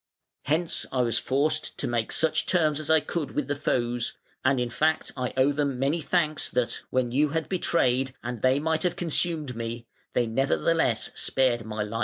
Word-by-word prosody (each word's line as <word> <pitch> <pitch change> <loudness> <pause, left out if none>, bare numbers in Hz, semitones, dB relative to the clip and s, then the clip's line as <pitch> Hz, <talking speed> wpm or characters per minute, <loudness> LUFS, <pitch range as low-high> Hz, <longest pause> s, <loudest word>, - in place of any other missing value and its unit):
Hence 160 +4 0
I 130 -1 +1
was 115 -2 +1
forced 155 +4 0
to - - -2
make 120 -2 -1
such 155 -1 +1
terms 155 -5 +2
as 155 - -5
I 160 -1 +5
could 150 -1 -4
with 150 -3 -1
the 145 - -1
foes, 120 -4 -1 0.3
and 130 0 +3
in 120 -1 -1
fact 155 +5 +1
I 125 -2 -2
owe 130 +2 +4
them 140 -2 -1
many 140 +6 0
thanks 155 -1 0
that, 125 -1 -1
when 130 -2 0
you 145 +4 +2
had 160 +2 -2
betrayed 135 -8 +1
and 120 -2 -5
they 130 +1 +4
might 160 +1 0
have 175 0 0
consumed 165 -5 0
me, 115 +1 -5 0.3
they 120 - +2
nevertheless 135 +1 +1
spared 120 -4 +1
my 110 -1 -3
life". 110 +2 -4
135 Hz, 190 wpm, -26 LUFS, 120-155 Hz, 0.3 s, I